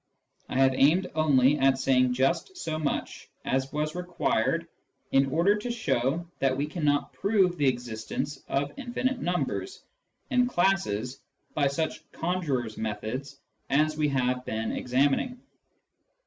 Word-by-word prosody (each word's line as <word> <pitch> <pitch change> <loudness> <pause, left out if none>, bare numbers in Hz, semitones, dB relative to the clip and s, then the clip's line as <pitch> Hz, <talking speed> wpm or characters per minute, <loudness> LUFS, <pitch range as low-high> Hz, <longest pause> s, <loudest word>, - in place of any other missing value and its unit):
I - - -4
have 135 0 +5
aimed 155 +8 +4
only 145 -2 +4
at 135 0 +4
saying 130 -1 +3
just 135 - 0
so 160 - -3
much 150 -3 -3 0.2
as 135 +1 0
was 150 0 -2
required 180 0 0 0.4
in 135 0 +4
order 170 +7 +3
to 210 +4 -5
show 155 - 0
that 135 -1 +1
we 140 - 0
cannot 150 -2 0
prove 195 -3 +2
the 145 -4 +1
existence 125 +3 -2
of 140 +1 -1
infinite 255 0 -2
numbers 180 - -2 0.5
and 250 -1 +3
classes 130 - 0 0.3
by 145 -2 +2
such 155 +3 -2
conjurer's 145 -10 -2
methods 110 +6 -4 0.3
as 155 +2 +2
we 150 -1 +1
have 125 -2 0
been 110 -2 -2
examining. 140 - +1
145 Hz, 135 wpm, -28 LUFS, 130-175 Hz, 0.5 s, have